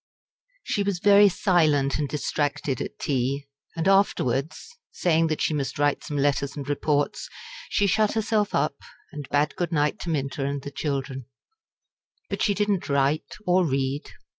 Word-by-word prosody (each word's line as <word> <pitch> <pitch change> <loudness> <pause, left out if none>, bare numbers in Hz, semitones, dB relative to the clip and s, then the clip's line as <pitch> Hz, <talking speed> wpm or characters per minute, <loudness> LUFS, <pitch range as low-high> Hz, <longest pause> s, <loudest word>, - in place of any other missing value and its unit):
She 205 - -1
was 200 -2 0
very 205 +2 +6
silent 155 -8 +2
and 145 -2 -1
distracted 145 -3 -2
at - - -6
tea, 140 +1 -1 0.3
and 165 +2 0
afterwards 160 - +1 0.2
saying 165 -2 +2
that 155 -1 -2
she - - +1
must 135 -3 -2
write 145 0 +1
some 145 - -4
letters 140 0 0
and 140 -1 -5
reports 145 0 -1 0.4
she 205 - +2
shut 210 +2 +2
herself 220 -1 0
up, 145 -2 0 0.3
and 145 -2 -8
bade 145 +1 +1
good 175 -2 -2
night 150 +4 +1
to 175 - -5
Minta 140 -3 -2
and 140 0 -3
the 140 - -6
children. 135 -3 -3 1.0
But - - -3
she 205 - +2
did 205 +1 0
not 195 -6 -1
write 140 +1 +1 0.2
or 180 +1 +3
read. 135 -2 -1
145 Hz, 165 wpm, -25 LUFS, 140-180 Hz, 1.0 s, very